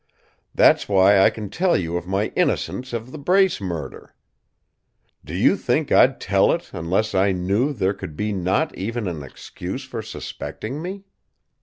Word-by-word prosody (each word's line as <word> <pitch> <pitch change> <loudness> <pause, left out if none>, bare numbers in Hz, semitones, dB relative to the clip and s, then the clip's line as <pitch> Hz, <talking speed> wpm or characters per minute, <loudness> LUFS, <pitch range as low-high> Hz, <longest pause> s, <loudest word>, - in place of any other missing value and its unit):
"That's - - +4
why 100 0 +5
I 95 - +6
can 105 -3 -7
tell 180 0 +2
you 85 -2 -3
of 90 0 -4
my 95 +3 0
innocence 130 +1 -1
of 120 +1 -5
the 155 - -8
Brace 185 - +2
murder. 85 -8 -6 1.1
Do - - -7
you - - +4
think - - -1
I'd - - +5
tell - - +3
it - - -5
unless 95 +7 -1
I 95 +1 +3
knew 100 +10 0
there 100 -7 0
could 80 - -8
be 105 0 -1
not 95 - 0
even 115 +2 -3
an 85 -4 -4
excuse 90 - -7
for 125 -3 -5
suspecting 120 +5 -6
me? 190 +3 -6
100 Hz, 165 wpm, -22 LUFS, 95-130 Hz, 1.1 s, I